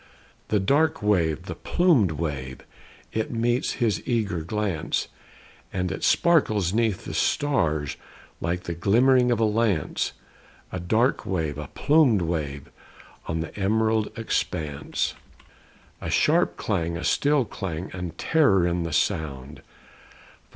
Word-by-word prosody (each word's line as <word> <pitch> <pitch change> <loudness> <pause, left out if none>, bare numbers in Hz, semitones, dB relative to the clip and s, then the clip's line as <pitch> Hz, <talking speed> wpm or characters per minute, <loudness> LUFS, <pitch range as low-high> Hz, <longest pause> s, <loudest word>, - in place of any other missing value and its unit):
The 105 - +2
dark 145 +8 +2
wave, 85 -6 +1
the 95 - -5
plumed 150 - +2
wave, 70 -4 -4 0.5
It 110 0 -1
meets 120 +1 0
his 110 -8 0
eager 105 -8 0
glance; 95 -1 -2 0.6
And 90 -2 -2
it - - -5
sparkles 110 - +3
'neath 110 -3 0
the - - -5
stars, 80 - 0 0.4
Like 90 +2 -2
the 85 - -4
glimmer 115 +10 +4
of 120 - +1
a - - +3
lance 105 -7 0 0.6
A 95 - -4
dark 110 +9 +1
wave, 80 -6 -2
a 75 - -6
plumed 140 - +3
wave, 75 -4 -3 0.6
On 80 0 -1
an 80 - -8
emerald 110 +2 +1
expanse. 80 -9 -2 0.9
A - - -4
sharp - - +2
clang, 85 0 -1
a 85 - -6
still 145 -3 +2
clang, 90 -4 -5
And 90 -2 -6
terror 135 - +3
in 85 0 0
the 85 -2 -3
sound! 70 -1 -2
95 Hz, 130 wpm, -25 LUFS, 80-115 Hz, 0.9 s, glimmer